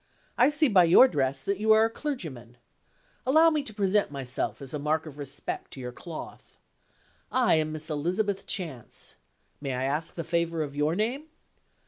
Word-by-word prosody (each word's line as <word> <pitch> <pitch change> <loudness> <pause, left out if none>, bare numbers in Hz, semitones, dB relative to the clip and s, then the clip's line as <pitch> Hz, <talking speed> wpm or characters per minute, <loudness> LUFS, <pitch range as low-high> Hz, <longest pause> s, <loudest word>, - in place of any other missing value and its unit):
I 250 +3 +5
see 300 +1 +3
by 190 -7 +5
your 175 +10 +8
dress 135 - 0
that 200 +4 -1
you 220 +1 +5
are 220 +1 +5
a - - 0
clergyman. 150 - -6 0.7
Allow 315 +5 +5
me 305 -2 +1
to 275 - -7
present 205 -1 +1
myself 135 -3 -4
as 135 -1 -7
a 150 - -2
mark 155 +2 0
of 150 -2 -10
respect 140 0 -5
to - - -9
your 125 -1 -5
cloth. 160 +5 -10 0.7
I 255 -2 +3
am 155 0 0
Miss 155 0 -4
Elizabeth 185 +7 -1
Chance. 155 - -4 0.5
May 135 -2 -3
I 125 +1 -2
ask 150 +4 -2
the 170 - -3
favor 170 -1 0
of 145 -1 -7
your 150 +3 +1
name?" 245 - -2
165 Hz, 180 wpm, -27 LUFS, 145-215 Hz, 0.7 s, your